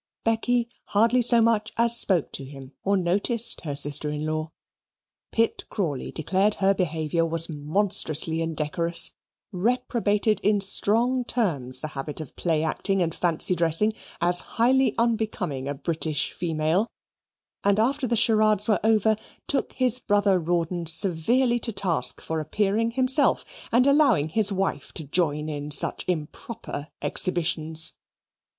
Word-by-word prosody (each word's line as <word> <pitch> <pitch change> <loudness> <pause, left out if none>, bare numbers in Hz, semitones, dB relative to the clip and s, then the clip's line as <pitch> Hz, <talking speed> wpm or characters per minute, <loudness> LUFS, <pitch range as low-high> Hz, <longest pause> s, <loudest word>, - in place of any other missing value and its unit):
Becky 235 +1 0 0.2
hardly 230 +4 +2
so 235 -1 +4
much 225 -2 0
as 235 0 +4
spoke 185 -8 +3
to - - -6
him 135 -1 -11
or 200 +1 +1
noticed 200 +6 +2
her 145 -2 -3
sister 145 +1 +2
in 150 +1 -4
law. 155 0 -3 0.8
Pitt 230 0 -1
Crawley 155 - -4
declared 190 +6 0
her 195 0 +2
behaviour 165 -3 -2
was 165 0 +2
monstrously 160 0 +1
indecorous, 165 +1 -1 0.4
reprobated 215 0 0
in 205 0 +1
strong 230 +6 +3
terms 145 - 0
the 155 - -5
habit 145 +1 -6
of 155 - -9
play 160 -3 -1
acting 195 +4 0
and 165 -2 -3
fancy 175 +1 +1
dressing 170 +5 +3 0.3
as 175 +1 +3 0.2
highly 260 +3 +2
unbecoming 215 - -2
a 145 - -3
British 155 -1 -1
female, 165 +4 -1 0.8
and 200 +1 +2
after 260 +4 0
the 235 - 0
charades 215 -2 +3
were 215 - +2
over, 220 0 +2 0.3
took 280 - -2
his 255 -1 0
brother 205 -4 +1
Rawdon 170 0 -2
severely 200 +10 +3
to 230 - -2
task 185 -5 -1
for 160 0 -4
appearing 205 +8 -1
himself 260 +4 +1 0.3
and 245 +2 +3
allowing 275 - +3
his 210 +3 +1
wife 190 -7 -3
to 160 - -5
join 150 0 -1
in 145 -1 -5
such 145 - +3
improper 160 0 -5 0.2
exhibitions. 160 -3 +1
185 Hz, 140 wpm, -24 LUFS, 155-225 Hz, 0.8 s, so